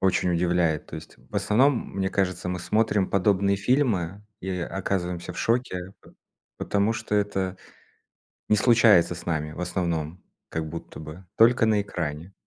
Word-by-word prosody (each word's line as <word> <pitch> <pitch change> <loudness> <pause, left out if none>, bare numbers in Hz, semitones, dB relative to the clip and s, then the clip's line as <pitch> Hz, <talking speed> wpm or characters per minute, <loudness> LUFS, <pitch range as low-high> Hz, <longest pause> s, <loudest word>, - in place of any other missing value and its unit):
очень 95 -1 +2
удивляет. 85 -2 +1
То - - -7
есть, - - -11
в - - -22
основном, 125 +4 +2
мне 95 0 0
кажется, 90 -2 -1
мы 90 - -2
смотрим 105 +1 +1
подобные 100 0 +2
фильмы 105 - 0 0.2
и 95 - -4
оказываемся 90 -1 -3
в - - -9
шоке, 100 -6 -1
по - - -18 0.5
потому 100 +2 +1
что 105 - -3
это 95 -2 0 0.9
не 105 - +4
случается 110 -7 +5
с 85 - -11
нами, 75 -2 -2
в 90 - -8
основном, 85 -1 -2 0.3
как 80 -1 -3
будто 85 0 -8
бы, 80 +4 -10
только 115 0 +5
на 105 -2 +3
экране. 85 -1 -5
95 Hz, 155 wpm, -25 LUFS, 85-105 Hz, 0.9 s, случается